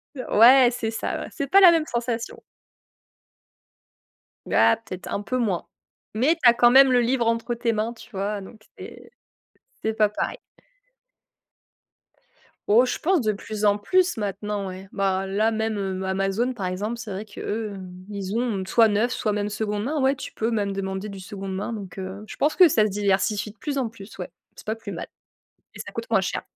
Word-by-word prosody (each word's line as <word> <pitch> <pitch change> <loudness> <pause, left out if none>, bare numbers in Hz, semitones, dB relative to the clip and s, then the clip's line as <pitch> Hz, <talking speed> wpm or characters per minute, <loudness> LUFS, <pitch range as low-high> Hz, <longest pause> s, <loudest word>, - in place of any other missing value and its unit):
ouais, 250 +1 +6
c'est 225 -2 -3
ça, 225 - -3
ouais, - - -6
c'est 280 -4 -4
pas 390 +7 +6
la 365 -3 +9
même 325 -2 +2
sensation. 235 -1 -3 2.0
Bah, 115 +1 +4
peut-être, 185 -5 -9
un 200 - -3
peu 255 +5 -2
moins, 205 -8 -1 0.5
mais 270 +10 +2
tu 330 - -26
as - - +5
quand 240 0 +5
même 265 +1 +7
le 250 - +4
livre 240 0 +1
entre 230 +1 0
tes 235 0 0
mains, 220 +2 -2
tu 230 - -15
vois? 200 +1 -3
Donc 215 +3 -13 0.2
c'est - - -11 0.7
c'est 220 0 -1
pas 215 -1 +3
pareil. 210 - -4 2.3
Oh, 235 +5 +5
je 250 - -2
pense, 365 0 +2
de 215 -3 0
plus 210 +1 -4
en 205 0 +4
plus, 365 - +2
maintenant, 205 -1 -3
ouais. 190 +1 -9
Bah, 195 -1 0
là, 215 +3 +1
même, 220 -1 -1
heu, 190 -1 -3
Amazon, 195 +6 0
par 195 -6 -5
exemple, 210 +6 -3
c'est 220 -3 -7
vrai 200 +3 -5
qu'eux, 215 +1 -4
heu, - - -8 0.3
ils 200 -1 -5
ont 225 -6 -1
soit 225 +3 +4
neuf, 215 +4 +1
soit 215 -4 -1
même 205 0 -1
seconde 210 0 -2
main. 295 +4 -2
Ouais, 265 +1 +3
tu - - -8
peux 225 +1 -1
même 205 -3 -1
demander 195 +1 -4
du 195 -1 -8
seconde 195 0 -7
main, 215 +4 -4
donc 200 -3 -8
heu, 190 +2 -6
je - - -10
pense 295 +3 +1
que 360 -4 +7
ça 215 -5 +3
se - - +2
diversifie 205 +1 0
de 225 - -27
plus 285 -2 -4
en 245 -4 -1
plus, 210 -2 -13
ouais. 180 - -6 0.3
C'est - - -13
pas 220 - -2
plus 205 -3 -7
mal 170 - -6 0.7
et - - -10
ça - - -8
coûte - - -6
moins - - +3
cher. - - -2
215 Hz, 200 wpm, -24 LUFS, 200-240 Hz, 2.3 s, la